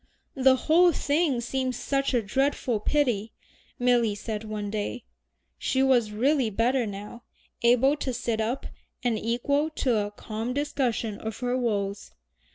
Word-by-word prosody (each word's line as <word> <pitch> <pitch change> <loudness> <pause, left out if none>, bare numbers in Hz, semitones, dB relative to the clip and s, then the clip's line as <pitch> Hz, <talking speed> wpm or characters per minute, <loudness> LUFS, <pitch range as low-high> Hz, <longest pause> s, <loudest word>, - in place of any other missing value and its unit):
"The 265 -1 +5
whole 335 +6 +4
thing 290 -4 +1
seems 255 +1 -2
such 275 -1 0
a 235 - +2
dreadful 260 0 0
pity," 230 -4 0 0.4
Milly 240 -4 +2
said 215 +1 -5
one 210 -2 -4
day. 215 +3 -3 0.6
She 265 0 +1
was 250 -5 +3
really 255 +3 +2
better 235 +3 +1
now, 205 +4 -8 0.4
able 250 +4 +4
to 270 - -2
sit 235 -2 -2
up, 235 +5 -2 0.4
and 240 -2 +1
equal 280 +7 0
to 255 -6 0
a 205 -1 -1
calm 220 +4 -5
discussion 250 -7 -1
of 220 -1 -5
her 245 0 0
woes. 205 -5 -2
245 Hz, 145 wpm, -27 LUFS, 220-270 Hz, 0.6 s, The